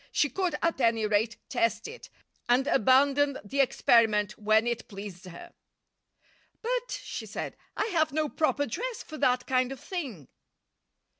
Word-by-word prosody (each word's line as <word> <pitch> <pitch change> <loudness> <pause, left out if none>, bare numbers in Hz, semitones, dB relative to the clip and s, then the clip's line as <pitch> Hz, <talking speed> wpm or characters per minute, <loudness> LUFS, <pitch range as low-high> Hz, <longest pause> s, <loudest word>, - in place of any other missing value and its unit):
She 290 - +1
could, 360 +1 -1
at 335 -5 +1
any 230 -2 +2
rate, 215 +2 +1
test 230 -3 0
it, 470 - -10 0.4
and 250 +2 +4
abandon 280 +2 +3
the 270 +7 -4
experiment 225 -5 +3
when 215 +1 +3
it 240 0 -2
pleased 195 -3 -9
her. 340 - -11 1.1
"But," - - -2
she - - -6
said, - - -5 0.2
"I - - +1
have 315 -2 +2
no 305 +1 0
proper 295 -1 0
dress 460 - -4
for 310 - -9
that 250 0 +2
kind 255 0 +1
of 270 - -7
thing." 260 - -6
255 Hz, 150 wpm, -28 LUFS, 220-310 Hz, 1.1 s, and